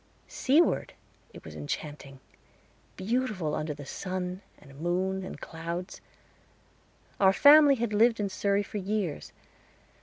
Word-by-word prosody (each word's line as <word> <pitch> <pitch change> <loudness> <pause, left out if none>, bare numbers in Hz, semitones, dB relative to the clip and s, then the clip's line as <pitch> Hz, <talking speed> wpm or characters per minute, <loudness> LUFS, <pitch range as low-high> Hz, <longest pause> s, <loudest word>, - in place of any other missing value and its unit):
Seaward 300 +6 +1 0.4
it - - -13
was - - -9
enchanting 145 -2 -6 0.8
beautiful 210 -6 -2
under 150 -1 -3
the 145 -1 -10
sun 185 +4 -5 0.2
and 140 -1 -16
moon 185 +3 -1
and 185 - -8
clouds. 170 +3 -6 1.2
Our 190 -1 +5
family 290 +3 +7
had 235 -3 -2
lived 225 +2 +3
in 205 - 0
Surrey 200 +1 0
for 210 - -7
years. 195 -5 -3
190 Hz, 120 wpm, -28 LUFS, 165-215 Hz, 1.2 s, family